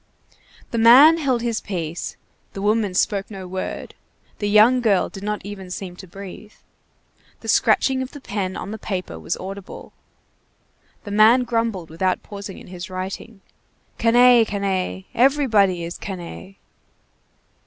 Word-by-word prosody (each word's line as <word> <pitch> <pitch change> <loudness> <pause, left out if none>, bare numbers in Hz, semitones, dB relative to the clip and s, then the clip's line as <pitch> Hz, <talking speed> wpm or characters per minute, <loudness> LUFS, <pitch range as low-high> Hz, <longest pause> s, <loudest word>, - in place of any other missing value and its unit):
The 230 - -1
man 275 +9 +8
held 260 -6 0
his 230 -2 -1
peace, 170 -4 -5 0.4
the 195 - -6
woman 210 -2 +1
spoke 200 0 0
no 190 -3 -8
word, 185 +1 -5 0.5
the 205 - -1
young 220 +5 +5
girl 205 -5 +2
did 195 - -10
not 210 0 -4
even 195 -2 -8
seem 180 0 -6
to 190 - -11
breathe. 200 +3 -10 0.9
The - - -10
scratching 265 -1 +3
of 260 - -4
the 290 - -11
pen 200 -7 -4
on 200 - -6
the 220 - -6
paper 180 - -5
was 80 - -3
audible. 195 +1 -9 1.1
The 205 - -8
man 220 +5 +5
grumbled, 230 -8 -2
without 185 +3 -1
pausing 200 -1 -8
in - - -12
his 180 +1 -8
writing. 190 +3 -6 0.6
"Canaille! 240 +1 +6
canaille! 195 -3 -2
everybody 225 -9 +3
is 170 +1 -6
canaille!" 190 0 -8
200 Hz, 145 wpm, -22 LUFS, 185-230 Hz, 1.1 s, man